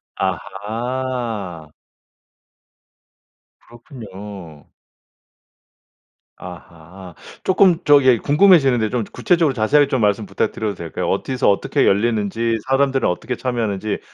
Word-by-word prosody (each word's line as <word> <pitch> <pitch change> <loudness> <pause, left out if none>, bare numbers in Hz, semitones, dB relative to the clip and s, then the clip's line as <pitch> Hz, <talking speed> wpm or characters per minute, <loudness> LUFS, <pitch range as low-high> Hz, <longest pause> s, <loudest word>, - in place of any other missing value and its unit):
아하. 105 - -4 1.9
그렇군요. 100 - -12 1.7
아하. 90 +1 -12 0.3
조금 190 -2 +3
저기 135 -4 +5
궁금해지는데 140 - +3
좀 120 -1 -2
구체적으로 170 -8 +1
자세하게 140 +6 +3
좀 130 -3 0
말씀 105 +1 +1
부탁드려도 100 +2 -3
될까요? 85 -2 -5
어디서 130 -3 0
어떻게 100 - +1
열리는지, 115 +2 0
사람들은 135 0 +1
어떻게 120 +8 -3
참여하는지 110 -5 -3
115 Hz, 260 characters per minute, -19 LUFS, 100-130 Hz, 1.9 s, 저기